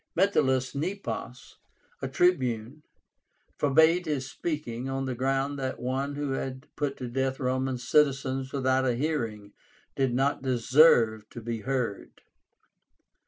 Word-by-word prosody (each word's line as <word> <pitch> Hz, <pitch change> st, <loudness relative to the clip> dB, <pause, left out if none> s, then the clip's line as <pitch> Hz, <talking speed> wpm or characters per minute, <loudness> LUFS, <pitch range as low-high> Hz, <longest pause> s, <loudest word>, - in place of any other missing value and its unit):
Metellus 130 Hz, -9 st, +2 dB
Nepos, 155 Hz, -6 st, -5 dB, 0.4 s
a 135 Hz, -, -2 dB
Tribune, 130 Hz, -4 st, +1 dB, 0.8 s
forbade 160 Hz, +5 st, +4 dB
his 140 Hz, -4 st, -2 dB
speaking, 135 Hz, -5 st, -4 dB
on 135 Hz, 0 st, -2 dB
the 130 Hz, -, -2 dB
ground 135 Hz, +3 st, -1 dB
that 130 Hz, -1 st, -3 dB
one 135 Hz, +3 st, -2 dB
who 145 Hz, -1 st, -2 dB
had 135 Hz, +1 st, -4 dB
put 145 Hz, -2 st, -2 dB
to 125 Hz, -, -5 dB
death 130 Hz, +2 st, -1 dB
Roman 130 Hz, 0 st, -1 dB
citizens 135 Hz, 0 st, +1 dB
without 130 Hz, -1 st, +1 dB
a 125 Hz, -2 st, +1 dB
hearing 115 Hz, -8 st, -3 dB, 0.4 s
did 135 Hz, -2 st, +1 dB
not 135 Hz, +2 st, +1 dB
deserve 120 Hz, -4 st, +4 dB
to -, -, -8 dB
be 115 Hz, 0 st, -4 dB
heard. 120 Hz, -3 st, -3 dB
130 Hz, 125 wpm, -28 LUFS, 125-145 Hz, 0.8 s, forbade